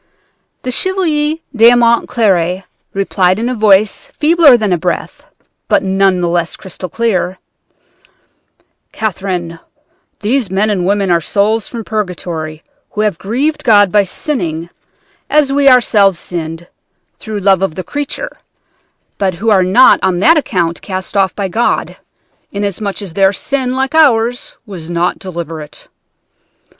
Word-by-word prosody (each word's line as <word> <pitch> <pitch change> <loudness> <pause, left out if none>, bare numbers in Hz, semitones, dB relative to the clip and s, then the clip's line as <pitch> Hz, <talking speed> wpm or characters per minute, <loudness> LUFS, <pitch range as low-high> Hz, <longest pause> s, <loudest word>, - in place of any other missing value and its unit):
"The 255 - -3
Chevalier 315 -2 0 0.2
d'Aumont 235 0 +4
Cléry 185 -5 +1 0.3
replied 190 -1 +1
in 230 +2 -2
a - - -1
voice 210 -2 +2
feebler 305 -4 +4
than 210 -5 0
a - - +1
breath, 175 +1 -4 0.4
but - - +2
none 190 -1 +2
the 175 - 0
less 170 -1 -1
crystal 185 -1 -8
clear: 190 -4 -1 1.5
"'Catherine, 180 -5 -4 0.6
these 230 0 0
men 200 +3 +1
and 185 -3 -1
women 200 -2 +1
are 170 -1 +3
souls 210 +5 0
from 235 -2 -6
purgatory 170 -7 -4 0.3
who 210 - -3
have 210 -6 -1
grieved 290 +9 -1
God 205 -6 +5
by 205 +1 +4
sinning 175 - -4 0.6
as 295 -2 +2
we 280 0 +4
ourselves 210 -7 +4
sinned 165 0 -6 0.5
through 215 -1 -6
love 195 -2 +2
of 195 -5 -1
the 185 - -5
creature, 290 - -5 0.8
but 190 -3 0
who 220 +5 0
are 195 -3 +5
not 190 +8 +5
on 190 -2 +1
that 315 - +5
account 175 - -1
cast 185 0 -6
off 195 -2 +1
by 200 -2 -2
God, 225 +6 -1 0.6
inasmuch 200 0 -3
as 185 -5 -9
their 195 +1 +3
sin, 255 +4 -2
like 265 +2 -1
ours, 245 -6 +2
was 175 -6 -9
not 175 +1 -1
deliberate. 165 -4 -8
200 Hz, 140 wpm, -14 LUFS, 180-235 Hz, 1.5 s, God